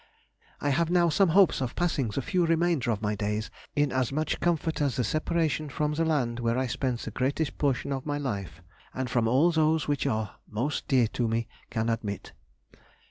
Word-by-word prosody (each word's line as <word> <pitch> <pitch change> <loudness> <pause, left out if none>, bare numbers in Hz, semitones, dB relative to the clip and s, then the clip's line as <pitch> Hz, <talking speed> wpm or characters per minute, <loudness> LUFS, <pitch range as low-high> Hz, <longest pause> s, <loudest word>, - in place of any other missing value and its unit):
I 145 - 0
have 165 +4 +1
now 175 -1 +4
some 170 +4 +3
hopes 185 -3 +4
of 125 -2 -3
passing 165 -7 0
the 110 +5 -3
few 180 +4 +1
remainder 165 -6 +2
of 110 -2 -1
my 105 0 +1
days 105 +1 -2 0.2
in 145 -2 +2
as 130 -1 0
much 155 +2 -1
comfort 165 -2 0
as 140 -5 +1
the 125 - +1
separation 155 +3 0
from 150 +2 -1
the 165 +2 +1
land 125 -7 0
where 115 0 0
I 130 - +1
spent 125 -1 -2
the 110 - -5
greatest 135 +5 -1
portion 140 -1 0
of 135 -1 -3
my 145 0 -1
life, 100 - -4 0.3
and 130 -1 -3
from 120 -2 +2
all 140 +9 +4
those 160 -1 +2
which 145 -1 0
are 110 -5 -2
most 125 +8 -2
dear 130 -4 +4
to 120 0 -1
me, 115 +1 -1 0.2
can 115 -1 -1
admit. 110 -3 -3
135 Hz, 200 wpm, -28 LUFS, 115-155 Hz, 0.3 s, now